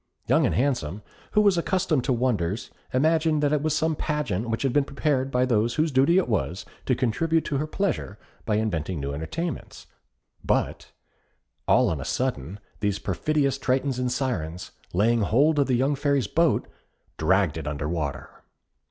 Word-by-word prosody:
Young - - +3
and - - -1
Handsome, 110 - -1 0.3
who 210 - +5
was 200 -4 +4
accustomed 170 -6 0
to 135 - +1
wonders, 115 -6 -1 0.2
imagined 155 +2 +2
that 145 0 +2
it 150 - +2
was 155 0 0
some 160 0 +1
pageant 130 - -2
which 115 +3 -1
had 135 -3 +1
been 145 - +4
prepared 140 -1 -1
by 125 -1 +2
those 115 -1 +1
whose 155 0 +1
duty 140 +7 +4
it 190 - +2
was 90 - -1 0.2
to 130 - +3
contribute 160 +8 +1
to 140 - -1
her 150 +3 -2
pleasure 160 - -2 0.3
by 105 - 0
inventing 95 -6 -1
new 70 0 -3
entertainments; 160 - -5 0.6
but - - -1 0.8
all - - +5
on 75 -4 -3
a - - -4
sudden 105 - -2 0.2
these 105 -1 0
perfidious 140 - 0
Tritons 130 0 0
and 125 0 0
Syrens, 90 - -3 0.2
laying 115 +5 +2
hold 145 +9 +3
of 140 - +3
the 130 - +2
young 135 +4 +2
Fairy's 140 -2 +1
boat, 165 0 +1 0.5
dragged 90 0 +2
it 80 -2 -5
under 75 0 -3
water. 75 -5 -4
130 Hz, 170 wpm, -25 LUFS, 100-150 Hz, 0.8 s, who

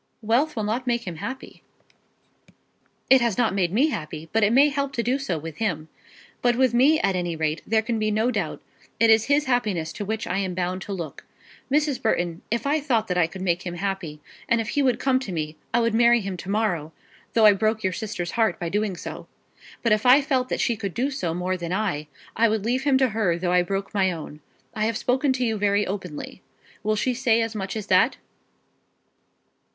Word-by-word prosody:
"Wealth 255 +8 +1
will 220 - -2
not 235 +5 -2
make 235 -1 0
him 175 -3 -6
happy." 260 +10 -7 1.5
"It 265 -1 +6
has 235 -5 0
not 230 -5 +2
made 185 -3 +1
me 260 +10 +3
happy; 160 - -6
but 225 0 +3
it 210 - +4
may 275 +5 +6
help 280 -1 -2
to 235 - -1
do 250 +4 0
so 190 -12 -2
with 155 0 -8
him. 160 -8 -2 0.5
But 245 -1 +3
with 255 -1 +2
me 280 +6 +5
at 195 -1 +1
any 175 -2 -2
rate 155 0 -1
there 220 0 +2
can 230 -1 -2
be 215 0 +1
no 220 +4 +1
doubt. 200 -9 -3 0.4
It 230 0 +5
is 220 0 +5
his 290 +1 +2
happiness 210 -11 0
to 210 - -5
which 220 +2 -3
I 180 - -1
am 185 -2 -2
bound 185 +1 -2
to 200 - -7
look. 170 -7 -6 0.5
Mrs. 290 -3 +1
Burton, 175 -7 0
if 235 +4 -1
I 295 +2 +2
thought 235 -7 0
that 180 - 0
I 165 - +3
could 185 +2 -8
make 175 -1 +1
him 175 -2 -5
happy, 175 -5 -4 0.3
and 235 - +3
if 225 - -3
he 290 - +1
would 255 -3 +2
come 260 -1 +2
to 260 -7 -6
me, 155 -2 -3 0.2
I 235 - +3
would 230 -1 +1
marry 235 +1 +5
him 195 -2 -4
to 185 - -8
morrow, 180 -7 -1 0.4
though 225 -2 +5
I 210 - +8
broke 215 +2 0
your 190 -1 0
sister's 180 -4 -4
heart 225 -2 +1
by 170 -2 -3
doing 205 +1 -1
so. - - -8 0.6
But 230 - +2
if 215 0 +3
I 270 +3 +7
felt 260 -3 0
that - - -2
she 235 - +1
could 200 -4 -5
do 260 +5 0
so 175 -12 -2
more 185 +1 -1
than 170 -1 -5
I, 185 -7 -1 0.3
I 230 +1 +4
would 215 -1 -1
leave 255 +4 0
him 275 -2 +4
to 260 -1 +3
her, 200 -6 0
though 175 0 -1
I 180 - +5
broke 195 +2 -3
my 190 -2 +2
own. 155 -3 -8 0.3
I 215 0 -1
have 225 0 0
spoken 260 +2 +1
to 255 -1 -1
you 225 -2 0
very 205 0 +2
openly. 185 -3 -6 0.4
Will 215 +1 0
she 250 +4 0
say 240 -2 +2
as 225 0 -4
much 195 -2 -4
as 215 -2 -4
that?" 195 +6 +3
215 Hz, 230 wpm, -24 LUFS, 180-240 Hz, 1.5 s, I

